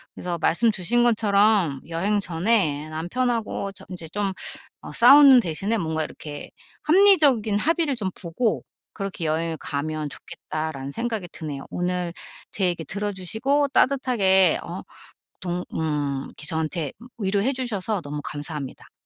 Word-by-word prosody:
그래서 175 -1 -4
말씀 225 +8 +3
주신 215 +5 +1
것처럼 205 - +3
여행 195 +6 0
전에 165 -5 0
남편하고 210 +5 -2
저 - - -14
인제 175 -3 -7
좀 200 +2 -2 0.5
어 - - -9
'싸우는 270 +1 +8
대신에 195 +5 -1
뭔가 160 -4 -1
이렇게 150 -1 -9 0.3
합리적인 300 - +5
합의를 320 +1 +1
좀 195 -4 -1
보고 195 +6 -1 0.3
그렇게 195 -4 -5
여행을 160 +1 -1
가면 155 +1 -3
좋겠다.'라는 155 -2 -6
생각이 225 0 -3
드네요. 145 -4 -6
오늘 180 -1 -2 0.4
제 195 - 0
얘기 175 -2 -1
들어주시고 210 - 0
따뜻하게 215 - +3
어 - - -6 0.6
동 180 0 -3
음 145 -4 -1
이렇게 150 - -10
저한테 160 -2 -2
음 240 - -12
위로해 200 +5 +1
주셔서 220 -6 -2
너무 145 -1 -5
감사합니다. 145 -2 -6
190 Hz, 315 characters per minute, -24 LUFS, 160-225 Hz, 0.6 s, 싸우는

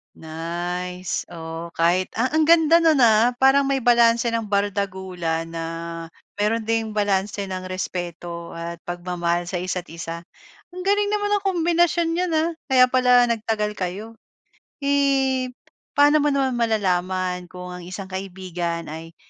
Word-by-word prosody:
Nice. 175 +3 -4
Oh, 165 0 -7
kahit 175 +2 +1
ah 250 - +3
ang 315 - +4
ganda 330 +1 +5
no'n, 315 -3 +4
ah. 230 0 +5
Parang 270 +1 +5
may 275 0 +1
balanse 235 -1 +4
ng 230 -1 0
bardagulan, 190 -5 -2
na 165 0 -5 0.7
mayro'n 215 +2 0
ding 225 -1 0
balanse 205 -1 0
ng 185 -1 -5
respeto 175 -2 -5
at 170 0 -7
pagmamahal 175 -1 -2
sa 180 - -4
isa't-isa. 170 -2 -4 0.6
Ang 365 - -5
galing 405 +2 +2
naman 410 0 -1
nung 410 -1 +1
kombinasyon 345 -1 +2
nyo, 350 +2 0
ah, 325 0 +1 0.2
kaya 260 -2 +6
pala 250 -1 +5
nagtagal 220 -2 0
kayo. 210 +4 -6 0.7
Eh, 270 -2 +2 0.5
paano 290 +1 +5
mo 295 - +2
naman 275 -2 +1
malalaman 185 -4 0
kung 180 0 -8
ang 180 - -7
isang 190 +1 -7
kaibigan 180 -4 -4
ay 165 +1 -9
200 Hz, 135 wpm, -23 LUFS, 175-260 Hz, 0.7 s, kaya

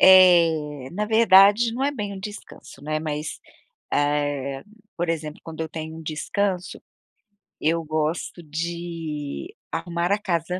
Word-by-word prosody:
eh, 165 -7 +6
na 210 +4 -1
verdade, 220 +1 +6
não 265 - -1
é 285 - +2
bem 210 -7 -4
um 190 - -8
descanso, 205 -8 -10
né. 155 +1 -2
Mas, 150 0 -4 0.5
eh, 145 -2 0 0.3
por 175 0 -1
exemplo, 155 -2 -3
quando 160 -1 -8
eu 160 - -4
tenho 160 0 -6
um 160 - -9
descanso, 180 +5 -2 0.8
eu 165 +2 +1
gosto 155 +3 -2
de 165 - -5 0.2
arrumar 175 +1 -1
a 205 - +4
casa. 180 -1 -1
165 Hz, 135 wpm, -24 LUFS, 155-190 Hz, 0.8 s, eh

